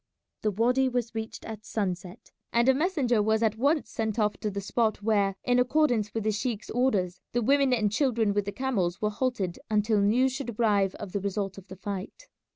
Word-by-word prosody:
The 215 - +1
wady 250 +6 +2
was 245 -2 -2
reached 220 0 -6
at 220 -1 -7
sunset, 185 -2 -4 0.2
and 235 +1 +3
a 265 - +7
messenger 275 - +1
was 220 +2 +2
at 220 -1 +2
once 290 +4 +1
sent 220 -1 -2
off 210 -2 +1
to 210 - -2
the 200 0 -4
spot 215 +1 0
where, 200 -3 +2
in 245 0 +3
accordance 245 -5 +2
with 225 - -3
the 215 - +1
sheik's 220 0 -3
orders, 195 -8 0
the 240 - +1
women 275 +2 +3
and 215 -5 +2
children 225 -4 +1
with 205 0 0
the 200 - -3
camels 200 -7 -1
were 210 0 0
halted 210 -6 -2
until 210 0 +2
news 245 +6 +3
should 245 -5 -5
arrive 200 -4 +2
of 205 -3 -7
the 200 - -1
result 195 0 -3
of 195 - -17
the 190 - -9
fight. 195 - -6
220 Hz, 205 wpm, -28 LUFS, 200-245 Hz, 0.2 s, a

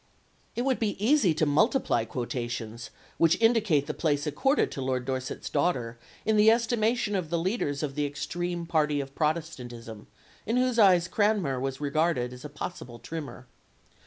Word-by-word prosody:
] - - -37
It 240 - -1
would 265 -1 +1
be 215 -3 -1
easy 215 - +3
to 155 0 +2
multiply 150 - +2
quotations 120 -1 -4 0.3
which 165 0 +4
indicate 220 -11 +3
the 150 - -3
place 145 -2 0
accorded 270 - +1
to 135 - -5
Lord 130 -1 -1
Dorset's 130 0 -4
daughter 125 -7 -1 0.3
in 220 0 +2
the 210 +1 +7
estimation 230 -1 +1
of 180 -5 -2
the 170 - 0
leaders 165 -5 -1
of 140 -2 -2
the 145 0 -1
extreme 175 +4 -4
party 150 -3 +1
of 135 -1 -5
Protestantism, 125 -9 -4 0.4
in 230 +3 0
whose 250 -2 +2
eyes 180 -4 +5
Cranmer 200 -11 +1
was 135 0 -3
regarded 145 -3 0
as 125 - -11
a 150 - -6
possible 145 -5 -7
trimmer. 135 +1 -7
155 Hz, 165 wpm, -28 LUFS, 130-205 Hz, 0.4 s, the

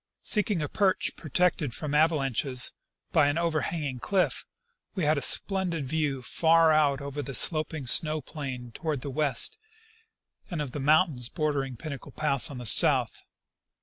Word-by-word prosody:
Seeking 205 -6 +1
a - - -2
perch 195 +2 0
protected 155 -4 -1
from 150 -2 -5
avalanches 135 -5 +2 0.4
by 155 -4 +3
an 145 +2 -1
overhanging 155 -5 -2
cliff, 190 +7 -1 0.5
we 185 - -2
had 155 +1 +2
a 145 - -3
splendid 180 -1 +1
view 145 -3 -2
far 165 +3 +3
out 145 -3 +2
over 140 +1 -5
the 135 -1 -6
sloping 155 -3 +2
snow 155 +5 +3
plain 130 -4 -8
toward 150 +1 -4
the 140 - -6
west 150 - +2 0.9
and 170 - -5
of 145 -4 -4
the 145 - -6
moun 155 +6 +3
tains 125 0 -7
bordering 145 -6 -2
Pinnacle 140 -3 -8
pass 140 -6 +2
on 140 - -8
the 125 - -8
south. 105 - +2
150 Hz, 155 wpm, -27 LUFS, 135-160 Hz, 0.9 s, by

